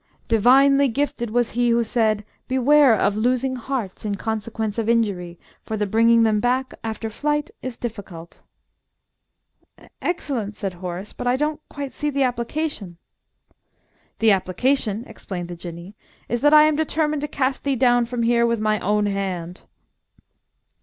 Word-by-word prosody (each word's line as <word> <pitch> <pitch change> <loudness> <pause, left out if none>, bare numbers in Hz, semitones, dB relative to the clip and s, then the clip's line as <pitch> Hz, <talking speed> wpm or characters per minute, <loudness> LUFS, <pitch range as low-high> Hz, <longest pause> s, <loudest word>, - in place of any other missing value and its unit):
"Divinely 275 +5 +5
gifted 260 -2 -2
was 240 +1 0
he 240 +1 +1
who 235 0 +3
said: 215 -2 0 0.2
'Beware 265 0 +5
of 205 0 +1
losing 255 +4 0
hearts 245 -5 -4
in 205 -1 -2
consequence 220 +1 -3
of 225 0 -1
injury, 195 -7 0 0.3
for 220 - -4
the 210 - 0
bringing 230 +3 +4
them 215 -2 +2
back 250 +3 0
after 225 0 -4
flight 295 +6 -2
is 255 -2 -6
difficult.'" 195 -8 -8 1.6
"Excellent!" 255 - -3
said 195 -3 -3
Horace. 180 +2 -6
"But 245 - -5
I 245 - +3
don't 300 +2 -1
quite 280 -2 -6
see 295 - -2
the 275 -1 +1
application." 240 - -3 1.2
"The 225 -1 +4
application," 210 +4 0
explained 180 -5 -7
the 175 - -6
Jinnee, 170 +2 -9 0.3
"is 240 0 -2
that 295 - +5
I 305 0 +8
am 310 0 +3
determined 305 -1 0
to 295 - -2
cast 265 -2 -1
thee 280 -1 0
down 245 -1 +3
from 240 -1 -2
here 235 0 +3
with 235 -1 0
my 215 0 +1
own 210 +3 +1
hand!" 190 -3 -4
230 Hz, 155 wpm, -22 LUFS, 205-265 Hz, 1.6 s, I